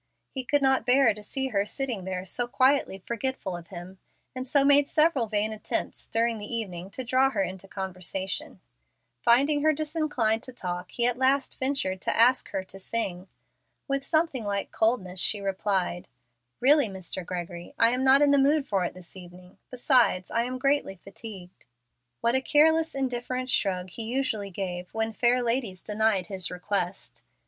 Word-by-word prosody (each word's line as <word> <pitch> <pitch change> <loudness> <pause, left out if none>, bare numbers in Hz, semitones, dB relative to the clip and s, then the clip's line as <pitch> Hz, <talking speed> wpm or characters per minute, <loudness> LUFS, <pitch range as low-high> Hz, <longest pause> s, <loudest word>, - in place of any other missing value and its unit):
He 265 - -4
could 285 +2 +1
not 265 0 +3
bear 250 -2 +4
to 210 - -11
see 265 +5 -3
her 200 -4 +1
sitting 230 -3 -3
there 185 -1 -4
so 240 +6 -1
quietly 255 -7 +2
forgetful 235 -5 -3
of 170 -1 -9
him, 185 +1 -10 0.4
and 255 0 -5
so 275 +1 +3
made 285 0 +5
several 305 -7 +3
vain 215 0 -1
attempts 215 - -3
during 230 0 0
the 205 +2 -7
evening 190 -6 -4
to 260 +6 -5
draw 260 +2 +3
her 205 -7 0
into 190 +1 -6
conversation. 190 0 -4 0.6
Finding 280 - +4
her 310 +1 +4
disinclined 295 -8 0
to 255 0 -10
talk, 180 -5 -4
he 235 - 0
at 245 0 +1
last 265 +1 +1
ventured 260 -9 -1
to - - -1
ask 250 +2 +4
her 190 - -3
to 195 +1 -9
sing. 190 -3 -3 0.6
With 275 -1 -1
something 310 -4 +1
like 200 -1 -2
coldness 195 -5 0
she 205 - +3
replied, 190 -2 -1 0.5
"Really, 285 +1 +5
Mr. 190 -1 -4
Gregory, 175 -1 -6
I 230 - +5
am 250 +1 -1
not 270 +2 +6
in 285 - +4
the 280 - +5
mood 280 +1 +3
for 195 -2 +1
it 175 - -3
this 180 0 -9
evening; 180 0 -13
besides, 250 -7 +2
I 230 +1 +1
am 255 +1 -4
greatly 275 -6 +1
fatigued." 195 -1 -11 0.5
What 235 - +2
a 260 - +2
careless, 320 +3 +3
indifferent 255 -1 -2
shrug 185 -2 0
he 230 - -4
usually 225 -3 -1
gave 180 -1 -5
when 225 0 -1
fair 245 +2 +2
ladies 230 -6 -1
denied 210 -3 +1
his 185 -4 -3
requests! 180 0 -3
225 Hz, 175 wpm, -27 LUFS, 190-265 Hz, 0.6 s, not